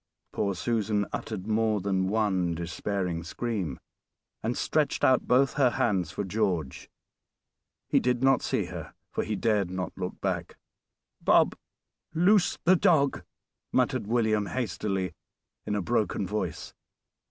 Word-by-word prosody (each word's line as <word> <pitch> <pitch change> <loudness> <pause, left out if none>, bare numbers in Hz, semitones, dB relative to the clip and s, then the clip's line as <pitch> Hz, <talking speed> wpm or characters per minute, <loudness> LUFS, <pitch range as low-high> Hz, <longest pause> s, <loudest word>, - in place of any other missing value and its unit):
Poor 100 -2 0
Susan 105 +1 0
uttered 100 -4 -4
more 110 -1 +1
than 95 -1 0
one 95 -5 +1
despairing 85 +1 -2
scream, 95 - -3 0.6
and 115 +2 -2
stretched 155 -2 0
out 130 -1 +4
both 130 +2 +4
her 135 -3 +4
hands 95 -8 0
for 105 - -3
George. 95 -8 -2 1.0
He - - +3
did 125 0 0
not 135 -2 +4
see - - 0
her, - - -8 0.2
for - - -1
he 110 - -2
dared 105 -4 +1
not 90 -1 -4
look 90 -1 -5
back. - - -3 0.6
"Bob, - - +4 0.6
loose 180 +3 +4
the 185 +2 +6
dog," 160 -7 +3 0.5
muttered - - +1
William 110 -3 +1
hastily, 95 -4 -2 0.5
in 105 - 0
a 100 - -1
broken 110 -2 0
voice. 95 -3 -4
105 Hz, 130 wpm, -28 LUFS, 95-120 Hz, 1.0 s, the